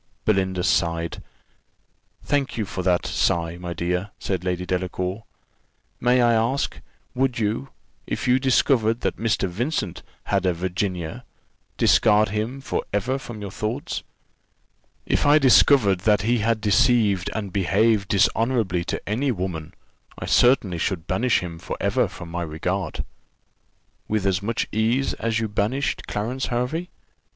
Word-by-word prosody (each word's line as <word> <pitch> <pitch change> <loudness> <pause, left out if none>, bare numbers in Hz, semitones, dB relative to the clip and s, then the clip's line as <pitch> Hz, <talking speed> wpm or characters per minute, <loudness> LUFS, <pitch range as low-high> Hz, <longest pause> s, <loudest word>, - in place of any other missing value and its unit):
Belinda 95 -3 +1
sighed. 85 -1 0 1.0
"Thank 145 -3 -1
you 110 - -1
for 95 - -4
that 90 -1 +1
sigh, 85 0 0
my 90 -1 -5
dear," 90 +3 -1
said 95 -3 -3
Lady 90 0 -2
Delacour. 90 +3 -3 0.7
"May 125 0 +3
I 120 -1 +4
ask, 115 +5 0 0.3
would 130 -1 0
you, 115 +5 -1 0.4
if - - -3
you 125 +1 +4
discovered 120 -3 +2
that - - -1
Mr. 110 -3 0
Vincent 120 - -2 0.2
had 95 -2 0
a 90 - +2
Virginia, 90 -1 -3 0.5
discard 105 -1 +4
him 110 +6 -3
for - - -2
ever 120 +7 0
from 120 -5 -8
your 100 -2 -6
thoughts?" 120 - -3 1.0
"If - - +1
I 145 +1 +7
discovered 130 -7 +5
that 105 +1 +2
he 120 +2 +2
had 110 0 +1
deceived 105 -2 +3
and 100 -4 -4
behaved 100 +2 +2
dishonourably 105 -3 +1
to - - -4
any 125 +7 0
woman, 90 -7 -4 0.4
I - - -5
certainly 110 -9 +3
should 85 -2 -2
banish 115 +8 +1
him 85 -2 -7
for - - -5
ever - - +1
from 85 -2 -10
my 85 +1 -3
regard." 85 +4 -3 1.0
"With 105 -2 -1
as 95 -1 +1
much 110 +3 -1
ease 115 +5 +1
as 115 -1 0
you 115 - -1
banished 120 +7 -1
Clarence 120 +6 -2
Hervey?" 130 +9 -2
105 Hz, 145 wpm, -23 LUFS, 90-120 Hz, 1.0 s, I